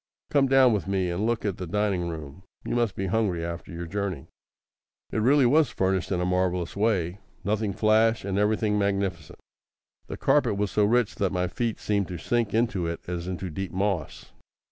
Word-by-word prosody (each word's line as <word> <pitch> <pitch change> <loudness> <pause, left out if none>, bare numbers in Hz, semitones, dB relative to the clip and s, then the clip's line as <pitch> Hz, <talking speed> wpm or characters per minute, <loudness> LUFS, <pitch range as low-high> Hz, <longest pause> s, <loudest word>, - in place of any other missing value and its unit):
Come 140 -2 +4
down 130 -2 +5
with 100 -3 -2
me 95 -2 0
and 100 +6 -1
look 115 -2 -1
at 100 -4 -1
the 90 - -5
dining 100 -2 0
room. 80 0 -8 0.2
You - - -2
must 120 -4 +1
be 95 - -2
hungry 95 -4 0
after 85 +2 -6
your 85 0 -5
journey." 95 -4 -3 0.9
It - - -2
really 135 +4 +5
was 145 +2 +4
furnished 95 -5 -1
in 90 - +1
a 90 - 0
marvellous 90 -1 0
way 100 -4 0 0.2
nothing 105 +1 0
flash, 110 +2 +2
and 100 0 -1
everything 105 0 +1
magnificent. 100 -5 -2 0.7
The - - -6
carpet 100 - +2
was 100 -1 -1
so 105 - +3
rich 120 +1 +2
that 100 -2 0
my 90 -1 0
feet 115 +5 -2
seemed 100 -2 0
to 90 - -5
sink 115 +5 0
into 110 -5 0
it 85 - -4
as 90 0 -4
into 90 -1 -4
deep 95 +4 -4
moss. 95 -4 -2
100 Hz, 190 wpm, -26 LUFS, 90-110 Hz, 0.9 s, down